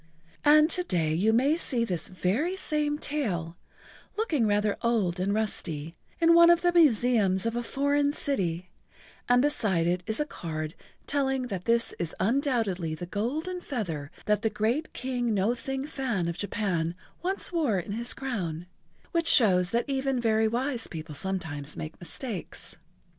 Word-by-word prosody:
And 305 +1 +7
to 360 - +1
day 165 - 0
you 195 +7 +3
may 265 +7 +3
see 250 -8 0
this 175 -7 -2
very 205 - -1
same 300 -5 -1
tail, 195 - -2 0.6
looking 310 - +1
rather 205 0 +1
old 205 -7 +1
and 190 +2 0
rusty, 165 -7 -2 0.3
in 335 0 +5
one 340 0 +8
of 345 0 +5
the 350 0 +2
museums 235 - +3
of 230 0 -1
a 240 - 0
foreign 285 +3 +1
city, 185 - -2 0.6
and 245 +1 +5
beside 210 - +1
it 175 +1 +1
is 220 0 0
a 300 - +1
card 155 - -5 0.3
telling 265 -3 0
that 185 -4 -4
this 230 0 +2
is 170 -2 -3
undoubtedly 215 - 0
the 175 - -6
golden 290 - -3
feather 170 - -4 0.2
that 210 -1 +2
the 220 - +1
great 220 +8 -1
King 245 -3 -1
No 200 +4 +2
Thing 270 +2 -4
Fan 255 - -2
of 170 - -2
Japan 180 -5 -1 0.3
once 375 +2 -1
wore 300 - +1
in 180 +2 -4
his 235 +3 -2
crown, 180 - -4 0.5
which 335 -2 0
shows 180 -7 +6
that 235 +4 0
even 270 -1 0
very 220 -1 +2
wise 245 +1 -1
people 160 -1 -7
sometimes 155 -4 -4
make 155 +1 -7
mistakes. 190 - -5
225 Hz, 160 wpm, -28 LUFS, 180-275 Hz, 0.6 s, one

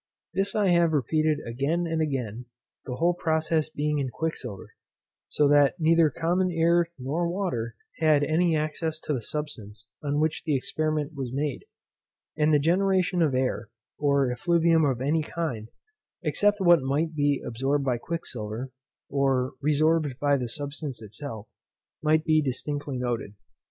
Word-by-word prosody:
This 195 +2 0
I 205 -3 +3
have 170 -2 +4
repeated 155 +1 +1
again 140 +9 -1
and 165 -1 -1
again, 125 -6 -3 0.4
the 125 - -3
whole 170 +5 +2
process 160 -2 0
being 150 -1 -1
in 135 -2 -1
quicksilver; 125 -8 -5 0.5
so 150 - +2
that 145 -1 +5
neither 165 0 +4
common 175 +5 0
air 170 +1 +3
nor 150 +7 -1
water, 170 - -2 0.2
had 155 -3 +4
any 160 +3 +2
access 155 +1 -2
to 150 - -2
the 130 - -2
substance 110 -7 -6 0.2
on 145 0 -1
which 155 0 0
the 155 -4 +1
experiment 155 +2 -1
was 135 -4 -4
made; 140 0 -2 0.7
and 155 0 +2
the 150 - +6
generation 180 +3 +2
of 150 -5 +2
air, 130 -3 -1 0.3
or 140 -3 +2
effluvium 165 +4 +3
of 130 -3 0
any 150 +4 +1
kind, 140 -9 -4 0.5
except 205 0 +2
what 175 -4 +5
might 145 +5 0
be 145 -2 +1
absorbed 135 +4 -1
by 125 -3 0
quicksilver, 125 -6 -5 0.4
or 135 -1 +1
resorbed 155 -2 +2
by 145 -1 +2
the 125 -3 -2
substance 145 0 -5
itself, 110 0 -7 0.5
might 155 +1 +2
be 155 0 +4
distinctly 145 0 -3
noted. 120 -4 -3
150 Hz, 150 wpm, -26 LUFS, 130-165 Hz, 0.7 s, the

